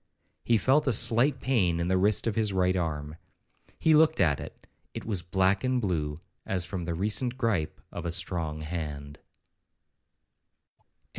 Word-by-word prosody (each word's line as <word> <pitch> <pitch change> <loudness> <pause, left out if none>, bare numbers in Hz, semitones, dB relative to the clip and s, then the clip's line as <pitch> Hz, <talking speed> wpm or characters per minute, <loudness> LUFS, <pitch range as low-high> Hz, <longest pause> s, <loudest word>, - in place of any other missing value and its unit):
He 115 - +3
felt 135 +8 +2
a 135 - +3
slight 125 +6 +2
pain 95 -10 +1
in 85 - -1
the 95 - +2
wrist 100 +1 +3
of 115 - 0
his 110 -1 0
right 95 -1 +1
arm. 75 -3 -3 0.6
He 160 - +3
looked 160 +1 +4
at 75 -6 +3
it, - - -10 0.3
it - - -6
was 100 -6 -2
black 95 +2 +1
and 130 -1 +1
blue, 80 -8 -2 0.3
as 90 -3 -1
from 90 -1 -5
the 85 -1 -3
recent 110 +7 0
gripe 110 -11 -1
of - - -5
a - - -2
strong 80 -3 -2
hand. 75 -3 -6
95 Hz, 160 wpm, -28 LUFS, 85-115 Hz, 0.6 s, looked